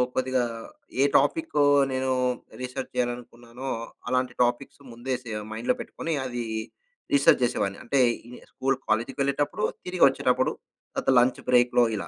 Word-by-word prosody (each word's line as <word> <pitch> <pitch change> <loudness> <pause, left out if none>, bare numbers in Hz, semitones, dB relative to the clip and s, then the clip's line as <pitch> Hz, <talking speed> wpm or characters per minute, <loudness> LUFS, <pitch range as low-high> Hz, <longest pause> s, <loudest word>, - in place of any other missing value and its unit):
కొద్దిగా 130 -1 +1 0.6
ఏ - - +6
టాపిక్కు 150 - +1 0.3
నేను 130 0 0 0.5
రీసెర్చ్ 130 +1 -5
జేయాలనుకున్నానో 120 +1 -4 0.4
అలాంటి 125 -1 0
టాపిక్స్ 120 +3 -2
ముందే 120 +3 -4
సె 115 - -7 0.2
మైండ్‌లో 115 +3 0
పెట్టుకొని 165 - -4
అది 120 -2 -3 0.7
రీసెర్చ్ 140 -1 +5
జేసేవాడిని. 100 -5 0
అంటే 140 - 0 0.3
ఈ - - -12
ని - - -9
స్కూలు, 135 +1 0
కాలేజికి 115 +2 0
వెళ్ళేటప్పుడు 145 +8 0 0.2
తిరిగొచ్చేటప్పుడు 135 -8 +3 0.4
తర్వాత - - -1
లంచ్ 125 +1 +2
బ్రేక్‌లో 120 0 +5
ఇలా. - - -5
125 Hz, 130 wpm, -26 LUFS, 120-135 Hz, 0.7 s, ఏ